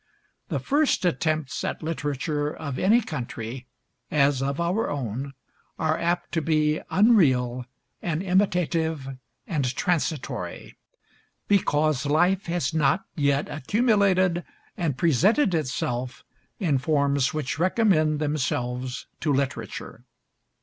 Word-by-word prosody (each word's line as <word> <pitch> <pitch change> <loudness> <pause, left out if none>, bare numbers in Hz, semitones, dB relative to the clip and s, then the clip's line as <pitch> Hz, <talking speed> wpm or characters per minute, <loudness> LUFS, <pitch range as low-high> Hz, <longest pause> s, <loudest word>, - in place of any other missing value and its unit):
The - - -1
first 285 -9 +1
attempts 155 -4 0
at - - -3
literature 150 -1 -2
of 140 -5 -5
any 220 +6 +4
country, 125 - -6 0.4
as 140 -2 +2
of 140 +2 -1
our 180 +6 0
own, 135 0 -4 0.4
are 160 -1 +1
apt 175 +1 -1
to 165 - 0
be 155 -1 +1
unreal 130 - +3 0.4
and 170 0 -2
imitative 165 -7 0 0.3
and 140 -7 -1
transitory, 160 -4 -2 0.7
because 155 -7 +2
life 175 +6 +2
has 170 -1 -1
not 155 +4 +2
yet 140 -2 +1
accumulated 190 - +2 0.3
and 155 -7 -1
presented 185 - +3
itself 125 -4 -2 0.3
in 155 -9 +1
forms 140 -2 +1
which 155 -1 -3
recommend 175 -5 +3
themselves 130 -4 -2
to 155 - 0
literature. 135 -1 -3
155 Hz, 110 wpm, -25 LUFS, 140-175 Hz, 0.7 s, any